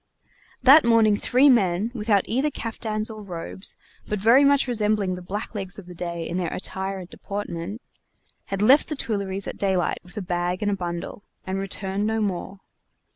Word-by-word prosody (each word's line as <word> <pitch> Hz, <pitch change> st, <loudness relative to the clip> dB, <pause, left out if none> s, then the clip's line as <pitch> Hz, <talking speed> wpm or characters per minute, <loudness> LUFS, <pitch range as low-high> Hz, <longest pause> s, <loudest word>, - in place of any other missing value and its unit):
That 275 Hz, +5 st, +8 dB
morning 225 Hz, -3 st, +5 dB
three 255 Hz, +6 st, +3 dB
men, 210 Hz, -4 st, +3 dB
without 210 Hz, -4 st, +2 dB
either 265 Hz, +6 st, 0 dB
caftans 220 Hz, -4 st, -4 dB
or 215 Hz, -1 st, -8 dB
robes, 185 Hz, 0 st, -2 dB, 0.3 s
but 210 Hz, -, -1 dB
very 235 Hz, +7 st, +6 dB
much 280 Hz, -1 st, +4 dB
resembling 210 Hz, -5 st, +1 dB
the 180 Hz, -, -6 dB
blacklegs 195 Hz, 0 st, -4 dB
of 205 Hz, -, -10 dB
the 180 Hz, -, -10 dB
day 170 Hz, -1 st, -4 dB
in 175 Hz, -, -3 dB
their 180 Hz, -2 st, -1 dB
attire 190 Hz, +1 st, -3 dB
and 185 Hz, -2 st, -8 dB
deportment, 200 Hz, +1 st, -6 dB, 0.6 s
had 195 Hz, +1 st, -2 dB
left 270 Hz, +7 st, +5 dB
the 305 Hz, -, -2 dB
Tuileries 200 Hz, -6 st, -2 dB
at -, -, -6 dB
daylight 190 Hz, -3 st, 0 dB
with 180 Hz, +4 st, -15 dB
a 205 Hz, -, -2 dB
bag 175 Hz, +1 st, -1 dB
and 205 Hz, -, +1 dB
a -, -, +1 dB
bundle, 175 Hz, +1 st, -5 dB, 0.2 s
and 190 Hz, +1 st, -2 dB
returned 195 Hz, +1 st, -2 dB
no 220 Hz, 0 st, 0 dB
more. 195 Hz, -1 st, -3 dB
200 Hz, 180 wpm, -24 LUFS, 185-220 Hz, 0.6 s, That